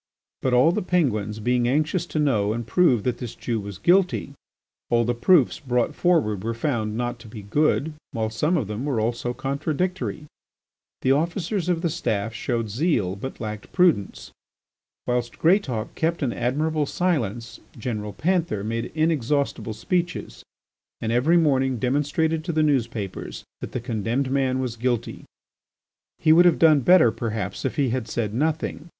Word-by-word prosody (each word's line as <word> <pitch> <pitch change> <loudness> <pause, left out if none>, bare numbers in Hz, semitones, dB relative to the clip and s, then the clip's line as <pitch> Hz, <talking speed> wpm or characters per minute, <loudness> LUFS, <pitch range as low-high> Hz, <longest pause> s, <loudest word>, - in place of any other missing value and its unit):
But 130 -1 +1
all 130 +7 +5
the 210 - -1
Penguins 110 - 0
being 120 +2 +1
anxious 155 +6 0
to - - -5
know 110 -9 +2
and 120 +1 -4
prove 125 - +3
that 125 +1 -1
this 120 -2 -6
Jew 115 -1 -2
was 100 -2 -7
guilty, 180 -5 +2 0.6
all 120 0 +3
the 120 - +1
proofs 130 +4 +3
brought 125 -5 0
forward 125 - +1
were 115 +1 -2
found 115 -4 -2
not 120 0 -2
to 115 - -13
be 105 -1 -9
good, 150 +7 +1 0.2
while 110 -1 -2
some 150 +10 +1
of 135 - -1
them 105 +4 -5
were 140 -5 -1
also 120 +2 -1
contradictory. 155 +5 -2 0.8
The 130 - +3
officers 170 +5 0
of 170 -1 0
the 170 - +2
Staff 110 -4 -2
showed 115 -2 -2
zeal 110 - 0
but 130 +7 -7
lacked 105 -2 -6
prudence. 175 - +1 0.7
Whilst 120 -1 -2
Greatauk 150 - +1
kept 165 0 -1
an 120 -4 0
admirable 150 +4 0
silence, 120 - -2 0.2
General 105 -3 -4
Panther 170 - 0
made 115 +2 -3
inexhaustible 145 -7 0
speeches 175 - -2 0.6
and 110 - -2
every 135 +9 +3
morning 135 -5 +2
demonstrated 150 - 0
in 165 - -1
the 155 - +3
newspapers 120 -9 -2 0.2
that - - -7
the - - -3
condemned 120 +3 -2
man 135 -1 +1
was 125 -3 -3
guilty. 120 -1 -2 0.9
He 155 -1 +4
would 175 +2 +6
have 175 -2 +5
done 155 -3 +6
better, 155 -4 +5
perhaps, 110 -2 -4
if - - -1
he 140 -3 +1
had 120 -1 -2
said 105 -3 -2
nothing. 155 +4 -2
130 Hz, 160 wpm, -24 LUFS, 115-160 Hz, 0.9 s, would